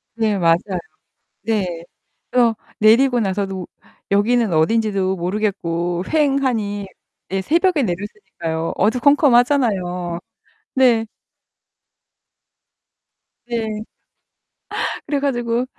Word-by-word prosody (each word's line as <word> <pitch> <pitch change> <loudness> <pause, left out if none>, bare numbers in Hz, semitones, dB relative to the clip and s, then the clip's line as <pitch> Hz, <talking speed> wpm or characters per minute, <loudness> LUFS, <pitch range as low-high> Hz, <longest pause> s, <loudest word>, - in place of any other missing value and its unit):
네, 220 -3 +1
맞아요. 165 -2 +4 0.9
네. 190 -6 -1 0.5
그래서 240 -3 +3 0.2
내리고 240 +4 +5
나서도 195 -3 -2 0.4
여기는 220 +2 +2
어딘지도 195 +2 +1
모르겠고 175 -2 -2
휑하니. 260 -10 0 0.4
네, 195 0 -1
새벽에 335 - +2
내렸으니까요. 175 -5 -4
어두컴컴하잖아요. 235 - +2 0.6
네. 245 -4 +4 2.4
네. 220 -3 -3 1.2
그래 285 -1 0
가지고 240 -3 0
215 Hz, 200 characters per minute, -20 LUFS, 185-245 Hz, 2.4 s, 내리고